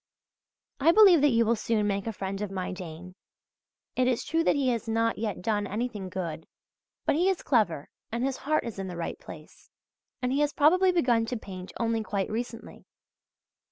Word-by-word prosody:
I 310 +5 +5
believe 380 -5 +7
that 295 - +5
you 230 -2 +3
will 230 +2 +3
soon 220 -1 0
make 200 0 -1
a - - 0
friend 195 -1 -5
of 210 - -2
my 190 -1 -4
Dane. 180 -1 -8 0.8
It 255 0 +2
is 250 -2 +1
true 330 +1 +1
that - - +4
he 275 -3 +1
has 235 -1 -2
not 225 0 0
yet 210 -5 -3
done 205 -1 0
anything 210 -2 -4
good; 170 -3 -5 0.6
but - - +3
he 350 +6 +2
is 380 - -1
clever 200 - +1 0.2
and 235 +2 -2
his 270 -1 -1
heart 310 +3 0
is 230 -4 -6
in 195 - -4
the 180 -2 -6
right 170 - -4
place, - - -13 0.5
and 250 0 -1
he 280 - +1
has 295 0 +1
probably 365 +6 +4
begun 245 -10 +2
to 245 - -2
paint 185 -3 -9
only 230 -1 0
quite 200 -2 -2
recently. 235 +1 -6
225 Hz, 195 wpm, -28 LUFS, 195-260 Hz, 0.8 s, believe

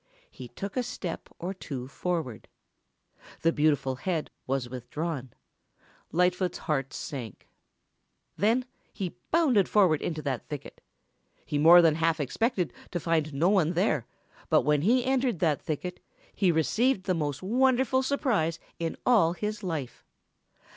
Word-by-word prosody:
He - - -9
took 200 0 -7
a 255 - +2
step 180 -7 -5
or 180 +3 -4
two 135 -9 -6
forward. 155 - -3 1.0
The 165 - +4
beautiful 145 -4 +1
head 160 +3 -2 0.2
was 130 -1 -1
withdrawn. 130 +2 -5 0.8
Lightfoot's 180 +1 +1
heart 135 -4 -2
sank. 125 - -7 0.9
Then 230 +5 +2 0.3
he 190 -5 -5
bounded 270 - +3
forward 185 -8 +4
into 155 -3 -3
that 135 -4 -3
thicket. 145 -2 -8 0.6
He 145 - -1
more 170 +3 +8
than 160 -2 +5
half 165 +1 +1
expected 185 - -1 0.2
to 175 - -2
find 160 -2 0
no 155 +6 +2
one 180 -5 +3
there, 165 - +1 0.4
but - - +4
when 150 +1 +2
he 240 - +3
entered 260 -5 +1
that 155 -4 +1
thicket 180 +4 -4 0.3
he 190 -4 +3
received 195 - +1
the 185 - 0
most 150 -2 -2
wonderful 260 +4 +3
surprise 245 - 0 0.2
in 165 -1 -3
all 205 -10 +4
his 210 +3 -4
life. 160 - -4
170 Hz, 140 wpm, -28 LUFS, 150-205 Hz, 1.0 s, more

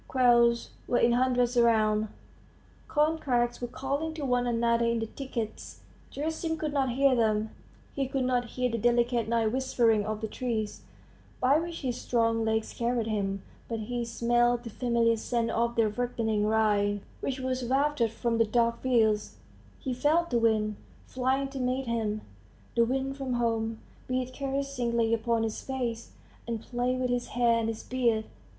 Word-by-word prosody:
Quails 235 -2 +3 0.2
were 245 - +2
in 235 - +4
hundreds 250 0 +2
around; 220 -2 +3 0.8
corncrakes 285 -7 +1
were 245 - -2
calling 280 +6 -3
to 300 -3 -4
one 245 -1 +1
another 235 0 +2
in 235 0 +1
the 225 - -1
thickets.... 230 -3 -6 0.3
Gerasim 320 +2 -2
could 305 -2 -3
not 265 -4 +1
hear 275 +1 +4
them; 220 -2 +1 0.4
he 275 -1 -1
could 270 0 -1
not 250 -1 +1
hear 250 +1 -1
the 230 - -1
delicate 240 0 +2
night 230 -2 +2
whispering 240 -4 +2
of 215 +1 -3
the 220 - -2
trees, 220 -2 -3 0.6
by 275 +4 +4
which 335 0 -5
his 250 -4 -3
strong 230 -1 +1
legs 220 0 -1
carried 235 -1 0
him, 195 -3 -2 0.2
but 225 -1 -3
he 240 +2 -3
smelt 240 +1 +1
the 230 - -7
familiar 235 -1 +2
scent 230 +1 -1
of 235 +1 0
the 225 -2 +3
ripening 220 -1 -1
rye, 205 -2 +2 0.2
which 270 -1 -3
was 260 0 -2
wafted 270 -1 +1
from 230 +1 -1
the - - +6
dark 235 +1 +1
fields; 220 -5 +2 0.4
he 260 - -3
felt 310 +6 +2
the 240 - +3
wind, 215 -2 +1 0.3
flying 260 +2 0
to 270 0 -6
meet 255 +1 -1
him 220 -3 -1 0.5
the 235 - +5
wind 265 +3 -1
from 270 -2 -3
home 225 -2 0 0.3
beat 255 0 -2
caressingly 255 -4 -1
upon 230 0 +1
his 220 -1 -3
face, 240 -4 -4 0.3
and 230 -1 -2
play 245 +1 -1
with 255 -1 -1
his 245 0 -1
hair 235 -1 +2
and 225 - -1
his 225 -1 -4
beard. 235 -4 +1
240 Hz, 165 wpm, -29 LUFS, 225-255 Hz, 0.8 s, the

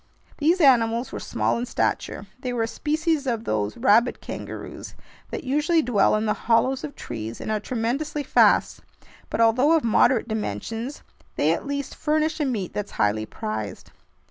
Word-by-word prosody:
These 335 +5 +3
animals 235 -3 +4
were - - -5
small - - -1
in 245 - -3
stature. 205 - -1
They 255 -1 -3
were 235 -2 0
a - - -1
species 305 +2 -1
of 230 -3 -1
those 105 - -2
"rabbit 230 +4 +3
kangaroos" - - -8 0.3
that - - -5
usually 300 +5 +2
dwell 215 -7 +3
in 215 +1 0
the 210 - +2
hollows 255 +4 +1
of 295 -2 -6
trees 115 -1 -6
and - - -4
are 215 - 0
tremendously 265 +7 -2
fast; - - +3 0.5
but - - -3
although 245 +7 +4
of 325 - +3
moderate 235 +1 +3
dimensions, 225 - -4 0.3
they - - +2
at - - -4
least 280 -1 -3
furnish 310 +1 0
a 300 - +1
meat 215 -9 -2
that's 205 -1 -4
highly 110 +1 0
prized. 105 -2 -5
240 Hz, 170 wpm, -24 LUFS, 215-290 Hz, 0.5 s, animals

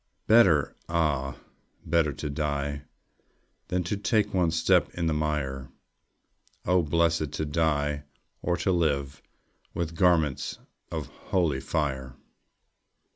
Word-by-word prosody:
Better, 95 -10 +5
ah, 75 -5 0 0.5
better 85 -3 +2
to 70 - -5
die 70 -1 -2 0.8
Than 90 0 0
to 85 +5 -2
take 105 +1 +1
one 90 -3 +3
step 80 0 +3
in 85 - -1
the 80 - +2
mire! 75 -3 -2 1.0
Oh, 90 0 +4
blessed 80 -1 +1
to 80 - -2
die 75 -1 0 0.4
or 90 -1 0
to 90 +3 +1
live, 70 -5 0 0.5
With 85 -1 -2
garments 80 -5 +2 0.3
of - - -3
holy 85 -8 -1
fire! 65 -4 -2
80 Hz, 115 wpm, -27 LUFS, 70-85 Hz, 1.0 s, Better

